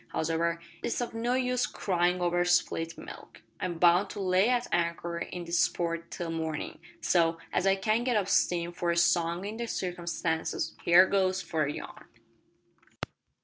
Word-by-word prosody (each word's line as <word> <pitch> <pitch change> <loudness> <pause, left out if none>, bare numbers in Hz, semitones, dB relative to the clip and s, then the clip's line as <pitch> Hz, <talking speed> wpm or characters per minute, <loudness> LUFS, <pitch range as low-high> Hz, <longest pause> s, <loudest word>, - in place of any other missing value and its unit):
Hows'ever, 165 +1 0 0.2
it's - - -2
of 240 -2 -3
no 235 +2 0
use 250 -1 +1
cryin' 180 -1 0
over 175 0 +2
spilt 170 -1 +1
milk. - - -11 0.2
I'm 175 -2 -3
bound 175 +3 +4
to - - -7
lay 190 +3 +3
at 245 -1 +1
anchor 170 0 -1
in 175 0 -6
this 170 0 +3
port 170 -1 -3
till 170 -2 -5
mornin', 160 -2 -4 0.2
so, 165 -2 +2 0.2
as 185 - +1
I 195 - +5
can't 215 +4 0
get 245 -3 +1
up 200 -2 0
steam 175 -3 +1
for 175 0 -2
a 170 - +1
song 170 +1 +2
in 215 +2 -5
the 235 0 -3
circumstances, 170 -4 -2
here 175 +2 +7
goes 190 -1 +1
for 155 -2 -1
a 140 - -2
yarn." - - -9
175 Hz, 170 wpm, -29 LUFS, 170-195 Hz, 0.2 s, here